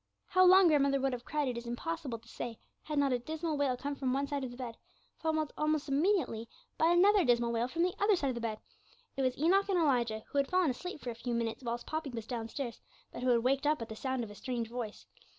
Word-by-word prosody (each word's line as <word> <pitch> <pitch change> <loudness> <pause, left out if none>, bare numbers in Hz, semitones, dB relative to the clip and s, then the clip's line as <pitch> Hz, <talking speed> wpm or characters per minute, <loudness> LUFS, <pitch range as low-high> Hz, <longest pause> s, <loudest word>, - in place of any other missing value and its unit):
How 370 -2 +4
long 370 0 +8
grandmother 280 -3 +3
would 270 0 0
have 245 0 -5
cried 300 -2 -1
it 245 -2 -2
is 235 - -10
impossible 275 +1 -3
to 230 +1 -21
say, 230 0 -6 0.2
had 300 -1 -4
not 280 -2 +3
a 245 - +1
dismal 315 +4 -3
wail 280 -3 +1
come 285 +3 -3
from 265 -2 -1
one 275 +1 +1
side 280 -1 -3
of 260 - -3
the 245 - -10
bed, 245 -3 -5 0.4
followed 315 -2 0
almost 305 0 0
immediately 280 - +1 0.3
by 320 - +3
another 380 +3 +5
dismal 235 -2 +3
wail 235 +1 0
from 335 +6 0
the 360 0 +1
other 405 0 +4
side 285 -6 -1
of - - -1
the 235 - -5
bed. 220 -2 -2 0.6
It 270 - -1
was 255 -1 +1
Enoch 385 +7 +3
and 380 - +2
Elijah, 240 -9 +1
who 285 - +1
had 275 - +2
fallen 365 -5 +3
asleep 360 +6 -7
for 245 - -4
a - - -5
few 235 +1 -3
minutes 230 +2 -2
whilst 240 0 -3
Poppy 310 -2 -3
was 230 -4 -6
downstairs, 235 +1 -5 0.3
but - - -6
who 255 - +1
had 235 -2 +3
waked 275 +3 +2
up 305 +1 +2
at 230 - -6
the 220 - -6
sound 260 +1 -2
of 215 - -7
a - - -9
strange 235 +1 -4
voice. 235 -4 -5
270 Hz, 255 wpm, -32 LUFS, 235-310 Hz, 0.6 s, long